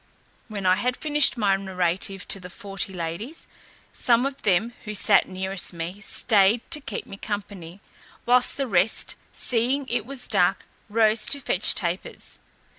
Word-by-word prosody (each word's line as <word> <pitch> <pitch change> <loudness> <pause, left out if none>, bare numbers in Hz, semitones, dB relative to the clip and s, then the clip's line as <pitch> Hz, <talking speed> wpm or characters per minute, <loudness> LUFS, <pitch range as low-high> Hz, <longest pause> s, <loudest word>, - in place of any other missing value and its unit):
When 205 -4 -6
I 185 0 +4
had 250 +4 -1
finished 295 -3 +2
my 200 -4 +2
narrative 190 -1 -2
to 195 - +2
the 180 -1 -10
forty 195 +1 -5
ladies, 185 - -6 0.5
some 240 +1 +2
of 275 0 -4
them 205 +4 +1
who 215 0 -5
sat 200 0 +5
nearest 190 0 -3
me 170 +4 -6
staid 215 0 +3
to 305 -2 +2
keep 225 - -6
me 195 - -10
company, 200 -4 -6 0.4
whilst 250 +1 +3
the 275 - 0
rest, 195 -2 +1 0.2
seeing 255 +3 +1
it 235 -2 -1
was 270 -2 -6
dark, 195 -2 +1 0.2
rose 215 0 +3
to 285 - +2
fetch 205 -7 +2
tapers. 175 0 -4
205 Hz, 155 wpm, -24 LUFS, 190-240 Hz, 0.5 s, sat